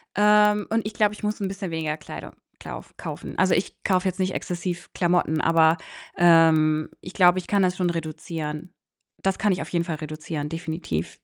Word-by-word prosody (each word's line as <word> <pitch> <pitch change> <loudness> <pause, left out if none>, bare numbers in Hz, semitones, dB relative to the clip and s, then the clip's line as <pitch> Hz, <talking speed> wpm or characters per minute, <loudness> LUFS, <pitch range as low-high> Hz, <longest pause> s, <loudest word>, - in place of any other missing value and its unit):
Ähm, 210 0 +4
und 225 -1 +1
ich 210 - -4
glaube, 210 -1 +2
ich 210 - -12
muss 210 0 -1
'n 195 - -1
bisschen 195 -2 -5
weniger 155 -2 -2
Kleidung - - -9 0.3
klauf - - -9
kaufen. - - -7
Also, 185 0 +4
ich 180 - -2
kaufe 185 -1 +2
jetzt 185 +1 -3
nicht 185 0 0
exzessiv 175 0 -4
Klamotten, 175 -3 +1
aber, 165 0 +4 0.4
ähm, 160 -2 +5
ich 180 - -9
glaube, 180 -1 +5
ich - - -10
kann 200 -1 +2
das 180 0 +1
schon 180 -2 +1
reduzieren. 160 0 -5 0.5
Das 195 0 +1
kann 205 -1 +2
ich 180 - -3
auf - - -6
jeden 170 -1 0
Fall 165 -3 -3
reduzieren, 155 -1 -5
definitiv. 160 - -4
175 Hz, 190 wpm, -24 LUFS, 160-190 Hz, 0.5 s, ähm